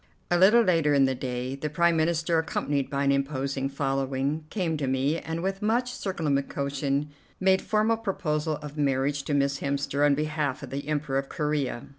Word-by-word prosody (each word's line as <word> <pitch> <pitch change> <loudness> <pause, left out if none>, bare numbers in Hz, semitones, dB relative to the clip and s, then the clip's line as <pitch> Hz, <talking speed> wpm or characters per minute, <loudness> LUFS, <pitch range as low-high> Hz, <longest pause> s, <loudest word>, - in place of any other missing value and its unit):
A 175 - +4
little 215 +6 +7
later 165 -7 +3
in 135 -1 +5
the 130 - +1
day, 125 0 -4
the 140 +3 -4
Prime 170 +3 +2
Minister, 165 +1 +1
accompanied 145 -3 -1
by 140 0 -1
an 140 - +3
imposing 135 -1 -1
following, 135 +2 -1
came 175 -6 -1
to 140 -2 -2
me, 135 +5 +1
and 165 +1 -4
with 195 +1 -2
much 240 +4 +1
circumlocution 140 - -1 0.3
made 190 0 +3
formal 215 +1 +1
proposal 160 -8 -1
of 150 0 -7
marriage 140 0 +1
to 145 - 0
Miss 140 0 +1
Hemster 140 0 -1
on 145 -1 +5
behalf 150 -2 -2
of 130 - -8
the 140 +1 -4
Emperor 145 -3 0
of 135 - -6
Corea. 150 -5 -1
145 Hz, 180 wpm, -27 LUFS, 140-165 Hz, 0.3 s, little